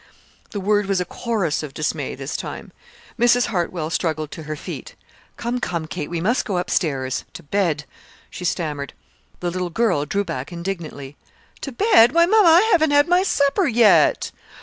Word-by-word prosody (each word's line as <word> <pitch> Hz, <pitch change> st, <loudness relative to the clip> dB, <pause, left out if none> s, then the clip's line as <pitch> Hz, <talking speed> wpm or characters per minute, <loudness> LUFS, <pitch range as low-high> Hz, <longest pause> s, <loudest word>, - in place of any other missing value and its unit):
The 205 Hz, -, -5 dB
word 205 Hz, +1 st, +1 dB
was 195 Hz, -2 st, +1 dB
a 180 Hz, -, -1 dB
chorus 205 Hz, -6 st, -2 dB
of 150 Hz, -3 st, -8 dB
dismay 155 Hz, -, -2 dB
this -, -, -6 dB
time. -, -, -6 dB, 0.5 s
Mrs. 245 Hz, +1 st, +4 dB
Hartwell 170 Hz, -4 st, -2 dB
struggled 155 Hz, -3 st, -2 dB
to -, -, -8 dB
her 155 Hz, -, -2 dB
feet. -, -, -8 dB, 0.4 s
"Come, 240 Hz, +1 st, -2 dB
come, 170 Hz, -8 st, -3 dB
Kate, 155 Hz, -1 st, -5 dB
we 170 Hz, -1 st, -3 dB
must 220 Hz, +9 st, +1 dB
go 195 Hz, -6 st, -2 dB
up 180 Hz, -, -3 dB
stairs 135 Hz, -6 st, -1 dB
to 170 Hz, -, -10 dB
bed," 160 Hz, -3 st, -1 dB, 0.5 s
she -, -, -8 dB
stammered. 150 Hz, -6 st, -2 dB, 0.5 s
The 175 Hz, -1 st, -1 dB
little 180 Hz, 0 st, -3 dB
girl 170 Hz, -6 st, 0 dB
drew 200 Hz, +6 st, 0 dB
back 135 Hz, -5 st, -5 dB
indignantly. 170 Hz, -6 st, -6 dB, 0.4 s
"To 275 Hz, -, -5 dB
bed? 250 Hz, -, +5 dB
Why, 335 Hz, +1 st, +5 dB
mama, 415 Hz, -1 st, +5 dB
I 330 Hz, +2 st, +7 dB
haven't 315 Hz, -4 st, +4 dB
had 290 Hz, +2 st, +4 dB
my 355 Hz, +1 st, +4 dB
supper 340 Hz, 0 st, +2 dB
yet!" 235 Hz, -4 st, +4 dB
185 Hz, 175 wpm, -21 LUFS, 155-240 Hz, 0.5 s, I